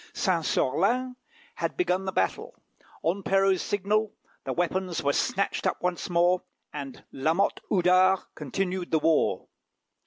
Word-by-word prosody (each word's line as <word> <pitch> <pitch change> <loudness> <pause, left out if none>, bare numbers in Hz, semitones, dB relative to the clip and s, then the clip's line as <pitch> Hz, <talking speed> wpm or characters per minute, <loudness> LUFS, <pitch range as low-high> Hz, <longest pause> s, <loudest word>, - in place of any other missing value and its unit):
Saint 180 -5 +1
Sorlin 230 - +1 0.4
had - - -3
begun 190 - 0
the 190 - -2
battle. 95 - -1 0.5
On 180 +5 0
Perrault's 195 -1 +2
signal 205 +2 0 0.3
the - - -2
weapons 175 0 -1
were 140 0 +2
snatched 200 +6 0
up - - -1
once 180 0 -2
more, 175 +1 +3 0.3
and 140 -3 -7
Lamotte 160 +9 +1
Houdard 185 0 +4
continued 180 +5 -3
the 160 - +3
war. 160 +1 +1
180 Hz, 130 wpm, -27 LUFS, 165-195 Hz, 0.5 s, Houdard